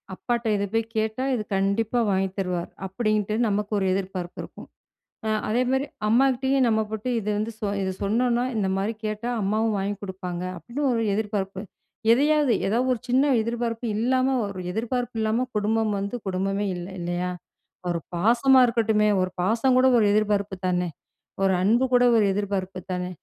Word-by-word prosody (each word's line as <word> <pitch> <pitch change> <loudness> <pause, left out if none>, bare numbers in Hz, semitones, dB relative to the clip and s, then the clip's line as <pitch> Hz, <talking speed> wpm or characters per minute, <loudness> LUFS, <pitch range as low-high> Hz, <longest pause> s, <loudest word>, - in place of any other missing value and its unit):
அப்பாட்ட 240 +3 -2
இத 200 - 0
போய் 225 0 +1
கேட்டா, 220 +3 -1
இது 220 - -2
கண்டிப்பா 205 +5 +1
வாங்கி 190 0 +1
தருவார். 180 -2 -2 0.2
அப்டின்ட்டு, 215 +1 0
நமக்கு 205 0 -1
ஒரு 195 - 0
எதிர்பார்ப்பு 185 -2 -4
இருக்கும். - - -12 0.6
அ - - +1 0.2
அதேமாரி, 255 +4 +1 0.2
அம்மாகிட்டயும் 265 +3 +3
நம்ம 220 -1 +2
போட்டு 220 +3 -4
இத 210 - -8
வந்து, 215 +2 -2 0.3
இத 190 - -1
சொன்னோனா, 235 +4 +1
இந்த 200 -3 +1
மாரி 200 +4 -1
கேட்டா 215 +3 -3
அம்மாவும் 215 +3 +1
வாங்கிக் 200 +1 -3
குடுப்பாங்க, 185 -2 -5
அப்டின்னு 240 +11 -5
ஒரு 230 - 0
எதிர்பார்ப்பு. 200 -3 -2 0.5
எதையாவது 290 +1 +4
ஏதாவது 240 +6 +1
ஒரு 240 - -4
சின்ன 260 +4 +3
எதிர்பார்ப்பு 230 +1 -3
இல்லாம 255 +3 +2
ஒரு 200 -2 -6
எதிர்பார்ப்பு 240 +3 -2
இல்லாம 220 +3 +1
குடும்பம் 215 +1 +1
வந்து 200 +4 -3
குடும்பமே 195 +2 -1
இல்ல, 175 0 -6
இல்லையா? 175 +1 -2 0.6
ஒரு 170 - 0 0.2
பாசமா 240 +8 +4
இருக்கட்டுமே 220 -3 +2
ஒரு 185 0 0
பாசம் 230 +7 +2
கூட 255 - +5
ஒரு 215 - +4
எதிர்பார்ப்பு 205 -2 +1
தானே, 180 -1 0 0.6
ஒரு 190 -1 +3
அன்பு 235 +6 +3
கூட 245 0 +5
ஒரு 215 - +4
எதிர்பார்ப்பு 190 -2 -3
தானே, 180 0 -3
215 Hz, 155 wpm, -25 LUFS, 195-240 Hz, 0.6 s, கூட